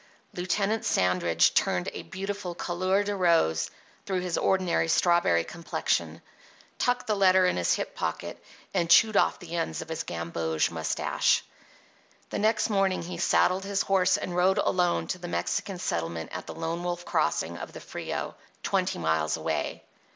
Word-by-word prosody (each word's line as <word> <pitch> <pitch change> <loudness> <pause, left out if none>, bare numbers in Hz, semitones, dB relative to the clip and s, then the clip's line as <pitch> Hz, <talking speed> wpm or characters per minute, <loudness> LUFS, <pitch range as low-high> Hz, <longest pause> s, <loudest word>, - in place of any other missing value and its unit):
Lieutenant 200 +4 0
Sandridge 90 -2 +2
turned 90 -1 +1
a - - -5
beautiful 195 -2 -5
couleur 185 +3 0
de 205 0 -2
rose 165 - +2 0.4
through 190 -2 0
his 180 -2 -2
ordinary 185 -3 +1
strawberry 165 - +3
complexion, 170 - -2 0.6
tucked 245 0 +1
the 220 - +1
letter 190 -2 +5
in 180 - +2
his 90 -1 +2
hip - - -4
pocket, - - -4 0.3
and 170 -1 0
chewed 215 +4 +6
off - - +3
the 170 -1 -8
ends 165 -1 -2
of 160 - -17
his 160 - -3
gamboge 85 -1 -2
moustache. 80 -1 +1 0.9
The - - -2
next 215 +1 +2
morning 195 -4 +1
he 170 0 -6
saddled 185 +2 +3
his 195 0 0
horse 185 -1 +3
and 175 - -5
rode 185 +3 +3
alone 180 -3 +1
to 185 - -4
the 175 - -6
Mexican 185 +2 -2
settlement 85 - -3
at - - -6
the - - -7
Lone 165 +1 -3
Wolf 175 0 -3
Crossing - - 0
of - - -7
the - - -8
Frio, - - -5 0.3
twenty 190 -2 0
miles 80 -2 0
away. - - -3
180 Hz, 160 wpm, -27 LUFS, 160-190 Hz, 0.9 s, chewed